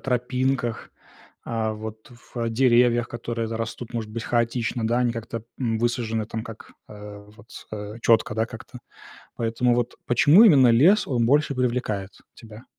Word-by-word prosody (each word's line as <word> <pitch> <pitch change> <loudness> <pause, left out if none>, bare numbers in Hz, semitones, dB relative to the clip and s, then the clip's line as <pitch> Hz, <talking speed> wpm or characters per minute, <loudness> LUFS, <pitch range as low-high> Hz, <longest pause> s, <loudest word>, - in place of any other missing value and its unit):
тропинках, 125 -1 -2 0.6
а 110 -1 -2
вот 110 +1 -9 0.2
в 115 -2 -2
деревьях, 120 0 +3
которые 115 -1 -4
т 115 - -4
растут, 115 +1 -6
может 110 -2 -4
быть, 115 +1 -6
хаотично, 120 0 -1
да, 120 +2 +1
они 125 -1 +1
как-то, 115 -1 -6 0.2
м, 115 -4 -1
высажены, 115 -2 -1
там, 110 +1 -5
как, 115 -1 -11 0.2
а, 105 -1 -10 0.2
вот, 115 0 -18 0.2
а 105 +1 -7
четко, 115 0 +2
да, 110 +1 0
как-то. 115 +1 -11 0.6
Поэтому 120 +1 0
вот 120 0 -2
почему 145 - +6
именно 140 - +6
лес, 170 - +4
он 120 -4 +1
больше 145 +2 +2
привлекает 120 -6 -2 0.2
тебя? 110 +1 -13
115 Hz, 155 wpm, -24 LUFS, 110-125 Hz, 0.6 s, почему